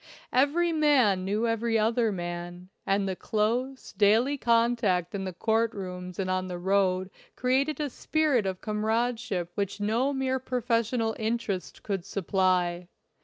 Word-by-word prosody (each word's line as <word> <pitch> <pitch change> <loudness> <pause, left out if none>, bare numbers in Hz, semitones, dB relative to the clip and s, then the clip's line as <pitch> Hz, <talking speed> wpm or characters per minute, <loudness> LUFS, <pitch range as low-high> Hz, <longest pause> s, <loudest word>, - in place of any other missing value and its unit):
Every 315 +6 +3
man 265 -12 +3
knew 210 +4 0
every 230 0 +1
other 225 +1 +2
man, 175 0 -6 0.2
and 195 0 +1
the 190 - -2
close, 240 +7 -2
daily 220 +7 +3
contact 230 -8 +1
in 195 -1 -3
the 185 - -3
court 225 +5 0
rooms 180 -2 -6
and 195 - -2
on 185 0 -1
the 180 -1 -5
road 185 0 +1 0.2
created 270 +5 +1
a 300 - 0
spirit 285 -5 +1
of 185 -1 -4
comradeship 220 -3 -1
which 200 +1 -3
no 225 +7 +1
mere 265 -1 -1
professional 235 -2 0
interest 220 -4 -3
could 195 -4 -2
supply. 185 -2 0
215 Hz, 140 wpm, -28 LUFS, 185-245 Hz, 0.2 s, Every